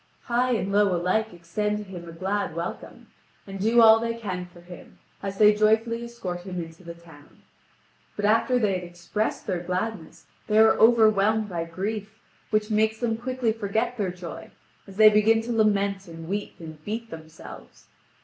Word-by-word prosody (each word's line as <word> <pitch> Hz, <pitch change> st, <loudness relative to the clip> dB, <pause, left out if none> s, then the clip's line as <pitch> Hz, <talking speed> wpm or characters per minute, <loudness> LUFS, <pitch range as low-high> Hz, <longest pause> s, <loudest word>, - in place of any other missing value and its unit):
High 245 Hz, +1 st, +1 dB
and 200 Hz, -3 st, -1 dB
low 200 Hz, -2 st, +3 dB
alike 185 Hz, +6 st, 0 dB
extend 185 Hz, +5 st, -3 dB
to 210 Hz, -, -6 dB
him 180 Hz, -4 st, -9 dB
a -, -, -8 dB
glad 190 Hz, +3 st, -3 dB
welcome, 170 Hz, +1 st, -7 dB, 0.3 s
and 195 Hz, -1 st, -8 dB
do 225 Hz, +4 st, +4 dB
all 220 Hz, 0 st, +8 dB
they 230 Hz, 0 st, -2 dB
can 185 Hz, -6 st, -5 dB
for 175 Hz, -1 st, -17 dB
him, 175 Hz, 0 st, -13 dB, 0.2 s
as 195 Hz, -1 st, -5 dB
they 210 Hz, 0 st, +6 dB
joyfully 220 Hz, +2 st, +1 dB
escort 200 Hz, -7 st, -6 dB
him 180 Hz, -1 st, -6 dB
into 165 Hz, +1 st, -9 dB
the 170 Hz, -1 st, -9 dB
town. 165 Hz, -4 st, -18 dB, 0.7 s
But 205 Hz, -, -2 dB
after 230 Hz, +4 st, +3 dB
they 210 Hz, -5 st, +1 dB
had 180 Hz, -1 st, -3 dB
expressed 175 Hz, +5 st, -4 dB
their 185 Hz, -3 st, -2 dB
gladness 180 Hz, +1 st, -4 dB, 0.2 s
they 215 Hz, -, +1 dB
are 220 Hz, 0 st, +7 dB
overwhelmed 220 Hz, -2 st, +4 dB
by 170 Hz, -2 st, -3 dB
grief, 205 Hz, +5 st, -5 dB, 0.3 s
which 215 Hz, 0 st, 0 dB
makes 220 Hz, +1 st, +1 dB
them 235 Hz, -2 st, 0 dB
quickly 245 Hz, -1 st, -1 dB
forget 225 Hz, +3 st, -2 dB
their 195 Hz, -3 st, 0 dB
joy, 180 Hz, -2 st, -9 dB, 0.4 s
as 195 Hz, 0 st, -13 dB
they 215 Hz, 0 st, +9 dB
begin 215 Hz, +2 st, +4 dB
to 240 Hz, -, -4 dB
lament 200 Hz, -3 st, +1 dB
and 165 Hz, -1 st, -10 dB
weep 205 Hz, +3 st, -4 dB
and 160 Hz, -2 st, -11 dB
beat 225 Hz, +3 st, -5 dB
themselves. 160 Hz, -, -12 dB
205 Hz, 180 wpm, -25 LUFS, 175-220 Hz, 0.7 s, they